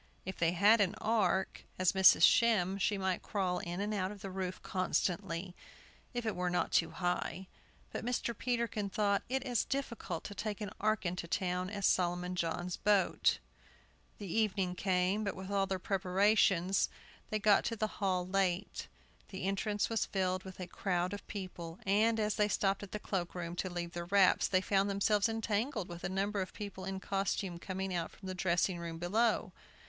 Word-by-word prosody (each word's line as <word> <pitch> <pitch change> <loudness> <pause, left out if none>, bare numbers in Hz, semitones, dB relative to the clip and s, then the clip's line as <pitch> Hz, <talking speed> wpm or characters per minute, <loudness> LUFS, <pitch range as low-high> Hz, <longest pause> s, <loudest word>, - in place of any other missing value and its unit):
If 190 0 -6
they 170 0 +3
had 205 +5 +5
an 200 +1 +1
ark, 195 -4 0
as 185 -1 +3
Mrs. 190 -1 +6
Shem 200 -5 +4
she 205 +1 +1
might 190 -1 -1
crawl 185 -3 -1
in 175 +1 -5
and 205 +1 -1
out 190 -2 -1
of 205 -2 -10
the 195 - -5
roof 185 -1 -4
constantly, 180 -1 -1 0.6
if 240 -2 -3
it 220 - -1
were 180 0 0
not 175 - 0
too 165 - +3
high. 180 +1 -2 0.5
But - - -4
Mr. 240 -1 -1
Peterkin 235 -4 -1
thought 200 0 +1
it 265 0 0
as 245 -5 +1
difficult 235 -11 -3
to 205 - -6
take 210 0 -4
an 210 -2 -4
ark 215 -1 +1
into 175 -1 -2
town 180 +1 -1
as 200 -1 -2
Solomon 180 0 +1
John's 175 +1 -2
boat. 205 -3 +3 0.8
The 205 - -7
evening 195 -2 0
came. 185 +2 +1
But 200 - -2
with 190 +1 -7
all 195 -1 +2
their 190 - -1
preparations 195 0 +2 0.4
they 215 - 0
got 210 -1 +4
to 230 - -1
the 215 -1 -4
hall 185 -2 +1
late. 190 0 -1 0.4
The 190 -2 -6
entrance 200 +2 0
was 225 -2 0
filled 185 -1 0
with 190 -1 -10
a 180 - -3
crowd 180 0 -1
of 205 - -7
people, 180 -4 -6
and, 220 +3 +3
as 210 -1 0
they 210 -1 +3
stopped 195 -1 +1
at 205 - -8
the - - -3
cloakroom, 175 -4 -3
to 185 - -1
leave 175 -1 -4
their 175 0 -5
wraps, 195 +1 +4
they 185 -1 +2
found 195 +1 +2
themselves 200 +2 +2
entangled 225 - -1
with 175 0 -9
a - - -1
number 200 +1 -1
of 185 - -5
people 195 -3 -7
in 190 0 -3
costume 195 -2 -2
coming 190 +1 -4
out 170 -2 -1
from 190 - -12
a 185 - -3
dressing 180 0 +1
room 165 -1 -5
below. 215 +7 +1
195 Hz, 185 wpm, -33 LUFS, 180-210 Hz, 0.8 s, Mrs